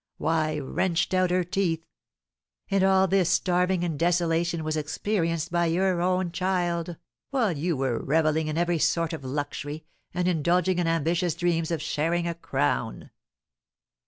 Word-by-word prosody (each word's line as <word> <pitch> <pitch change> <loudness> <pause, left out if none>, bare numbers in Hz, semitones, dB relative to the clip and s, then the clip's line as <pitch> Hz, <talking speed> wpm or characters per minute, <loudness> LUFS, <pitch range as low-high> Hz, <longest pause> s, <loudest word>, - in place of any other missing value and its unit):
Why, 155 -1 0
wrenched 170 +6 -1
out 185 -1 +3
her 180 0 +2
teeth! 170 -2 -1 0.9
And 195 -1 +3
all 190 0 +4
this 185 -2 +2
starving 180 0 +1
and 165 -5 -2
desolation 170 -1 +1
was 155 0 -1
experienced 165 +1 -1
by 170 -1 +2
your 180 +1 +1
own 180 0 +1
child, 175 -2 -1 0.3
while 250 -8 +1
you 160 +1 -1
were 130 -3 0
revelling 155 +1 +1
in 155 +1 -2
every 175 -1 +1
sort 165 +1 +1
of 155 - -6
luxury, 145 +3 -4 0.3
and 180 0 -1
indulging 180 +2 +2
in 175 - +1
ambitious 165 +1 +1
dreams 170 -2 0
of 165 -3 -2
sharing 165 +3 0
a 170 - -1
crown!" 165 - -2
170 Hz, 150 wpm, -26 LUFS, 160-180 Hz, 0.9 s, all